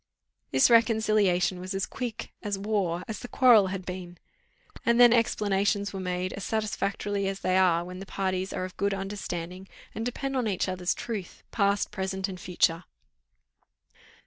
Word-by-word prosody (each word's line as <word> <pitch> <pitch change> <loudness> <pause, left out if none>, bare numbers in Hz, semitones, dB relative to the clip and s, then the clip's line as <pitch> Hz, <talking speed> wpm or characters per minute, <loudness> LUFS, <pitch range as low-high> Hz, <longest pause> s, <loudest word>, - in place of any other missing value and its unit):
This 130 - +4
reconciliation 215 -5 +3
was 185 +2 -5
as 195 - 0
quick, 240 -4 -5
as 205 -2 -2
warm, 195 -4 -1
as 220 - -5
the - - -7
quarrel 240 -7 +6
had 190 -1 -5
been. 180 -1 -7 0.7
And 235 -1 +3
then 240 -1 +8
explanations 205 -3 +1
were 195 - -4
made, 180 0 -2
as 195 - -6
satisfactorily 205 -2 -1
as 195 0 -4
they 185 - +1
are 175 -2 +3
when 180 +1 -8
the 195 - -8
parties 190 -1 -2
are 185 - -3
of 185 - -9
good 200 0 0
understanding, 190 -2 -5 0.3
and 225 - -4
depend 270 +3 -3
on 250 -3 0
each 195 -2 0
other's 185 -1 -1
truth, 215 -7 -6
past, 200 -2 +1
present, 190 0 -2
and 185 -2 -7
future. 175 -1 +1
195 Hz, 165 wpm, -27 LUFS, 185-215 Hz, 0.7 s, then